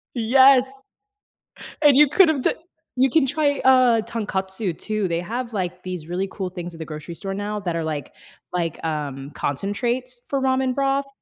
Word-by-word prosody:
Yes! 265 +3 +4 1.0
And 290 -3 +6
you 295 +1 +7
could 340 +5 +5
have 295 -5 0
d - - +2 0.4
you 260 +2 +4
can 300 +1 +3
try 285 +1 0
uh 255 -3 +5
Tonkatsu 195 -4 -2
too. 215 -3 -2
They 170 0 -1
have 235 +6 -5
like 180 -3 -3
these 180 -4 -6
really 180 +3 -2
cool 190 -3 -4
things 175 -1 -7
at - - -11
the 160 - -5
grocery 155 +2 -8
store 195 +3 -5
now 205 +1 -3
that 175 -4 -3
are 165 - -2
like 155 -2 -4 0.4
like, 170 -3 -2
um, 145 -3 -4
concentrates 235 - -2
for 275 - -1
ramen 260 -1 +1
broth. 275 0 0
210 Hz, 175 wpm, -22 LUFS, 175-260 Hz, 1.0 s, you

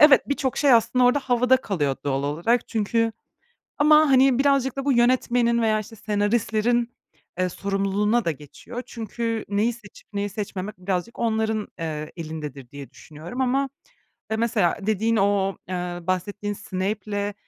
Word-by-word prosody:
evet, 295 -3 +7
birçok 275 -2 -1
şey 280 -3 +4
aslında 235 +2 +4
orada 250 +4 +4
havada 250 -1 +3
kalıyor 150 - -1
doğal 135 -1 0
olarak. 170 +12 0
Çünkü 225 +1 0 0.7
Ama, 300 +1 +6
hani, 265 -1 +5
birazcık 275 -2 +2
da 275 - -3
bu 280 - +3
yönetmenin 240 -1 +2
veya, 215 -1 +2
işte, 220 +2 -10
senaristlerin, 225 +3 0 0.5
ııı, 185 - +1
sorumluluğuna 200 +4 0
da 165 - +1
geçiyor. 160 - -8
Çünkü 230 0 -4
neyi 210 +4 +1
seçip 215 -4 -15
neyi 205 0 -2
seçmemek 200 -1 -5
birazcık 185 +4 -3
onların, 220 -2 0
eee, 155 -2 -4
elindedir 150 -6 -7
diye 140 -1 -9
düşünüyorum 160 - -9
ama, 270 +2 +1 0.6
ya, 220 - 0
mesela 220 -6 +1
dediğin 220 +2 +1
o, 195 -2 +1
ııı, 175 -1 -4
bahsettiğin 205 +3 -2
Snape'le 205 +2 -3
215 Hz, 145 wpm, -24 LUFS, 185-240 Hz, 0.7 s, evet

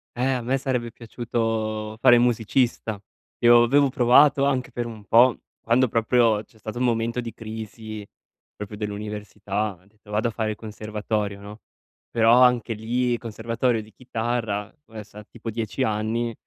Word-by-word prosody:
Eh, 125 - -2
a 130 -2 -1
me 125 +3 0
sarebbe 125 -3 -2
piaciuto 110 -2 -3
fare 120 0 +7
musicista. 120 -2 +1 0.4
Io 120 0 +7
avevo 140 +3 +4
provato 135 +3 +5
anche 130 -3 0
per 120 - -3
un 110 -3 -10
po', 120 +5 +5 0.2
quando 125 +3 +3
proprio 115 -1 +2
c'è 110 - -25
stato 110 +2 -7
un 125 - +1
momento 115 0 0
di 115 -2 -7
crisi, 110 -1 -8 0.5
proprio 105 0 -7
dell'università. 105 -1 -4
Ho 90 - -27
detto: 105 +1 -24
"Vado 105 +3 0
a - - -6
fare 110 -1 -2
il - - -4
conservatorio", 105 -1 -4
no. 105 +2 -11 0.5
Però 115 -1 +3
anche 125 -2 +3
lì, 120 +3 -1
il 120 - -2
conservatorio 115 +1 -1
di 110 - -17
chitarra 115 -4 -3
ve 110 -1 -9
sa 105 +1 -13
tipo 115 +1 -8
10 115 +3 -2
anni 115 +1 -1
115 Hz, 160 wpm, -24 LUFS, 105-120 Hz, 0.5 s, fare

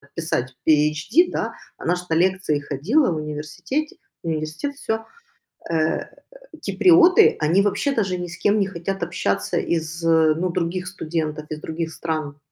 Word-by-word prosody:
писать 130 -6 -2
PHD, 160 - +3
да, - - -2 0.2
она 180 - 0
ж 180 - -5
на - - +1
лекции 185 -4 +2
ходила 175 - +1
в - - -1
университете 155 - -4 0.3
университет- 160 - -3
всё. 225 -4 -3 0.7
Э, 160 -1 0 0.6
киприоты- 360 +3 +6
они 170 +6 +3
вообще 240 +7 0
даже 190 -7 0
ни 175 - -4
с 175 - -9
кем 210 +1 +2
не 195 - +2
хотят 195 0 -4
общаться 100 - -1
из, 165 0 -2
э, 160 -1 +4
ну, 180 +1 -1
других 180 +1 -2
студентов, 155 -4 -3
из 155 0 -5
других 160 0 -4
стран. 155 -4 -4
165 Hz, 150 wpm, -22 LUFS, 155-195 Hz, 0.7 s, киприоты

